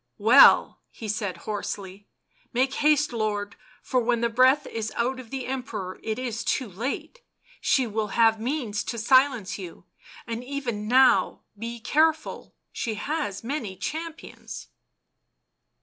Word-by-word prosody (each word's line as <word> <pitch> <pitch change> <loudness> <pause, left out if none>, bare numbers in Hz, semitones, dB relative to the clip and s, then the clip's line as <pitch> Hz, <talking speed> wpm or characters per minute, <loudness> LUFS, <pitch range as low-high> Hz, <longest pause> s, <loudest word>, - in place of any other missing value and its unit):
" - - -53
Well," 230 +6 +6
he 225 - -9
said 205 -3 -2
hoarsely, 200 -1 -5 0.2
" - - -38
make 260 +2 +1
haste, 300 -1 +2
lord, 210 -2 -2 0.3
for 255 - +1
when 235 0 +1
the 235 - +2
breath 260 +4 +4
is 220 -1 -4
out 255 +3 -1
of 245 -3 -11
the 265 0 -4
Emperor 230 -8 -5
it 220 0 -3
is 240 -3 -3
too 260 - 0
late... 245 - -5 0.4
she 265 - +2
will 220 -1 -2
have 225 +1 +3
means 235 -4 -2
to 235 - -4
silence 250 -3 +3
you, 180 -3 -9 0.4
and 230 0 -5
even 250 -6 -4
now 260 +2 +4
be 230 +3 -6
careful... 315 +6 0 0.2
she 225 -2 -3
has 250 -5 -3
many 230 -6 -4
champions." 320 - -7
235 Hz, 145 wpm, -26 LUFS, 215-265 Hz, 0.4 s, Well